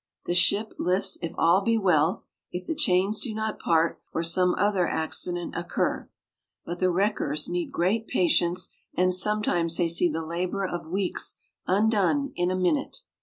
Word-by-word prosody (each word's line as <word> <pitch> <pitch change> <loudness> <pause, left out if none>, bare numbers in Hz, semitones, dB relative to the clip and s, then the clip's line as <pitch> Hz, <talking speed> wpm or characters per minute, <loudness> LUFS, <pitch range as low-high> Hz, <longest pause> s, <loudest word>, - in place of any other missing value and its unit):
The - - -1
ship 200 +4 +3
lifts 185 +1 0
if 165 - -3
all 170 +4 +4
be 230 +3 +1
well 175 -4 +2 0.3
if 180 +1 -5
the - - -2
chains 210 - +2
do 225 -4 -3
not 220 0 -3
part, 165 0 +1
or 165 - -2
some 180 +2 +3
other 195 -3 +1
accident 175 +2 -3
occur; 175 - -2 0.6
but 175 +1 -5
the 185 - +2
wreckers 175 -6 0
need 175 0 -3
great 205 +6 0
patience, 175 0 +1 0.3
and 185 0 +2
sometimes 180 -4 +1
they 175 - +2
see 170 +1 +2
the 160 +1 -3
labor 180 +4 -2
of 175 -3 -5
weeks 185 +2 -1 0.3
undone 220 +7 +2
in 175 0 0
a 185 - 0
minute. 275 - -1
180 Hz, 165 wpm, -26 LUFS, 170-205 Hz, 0.6 s, all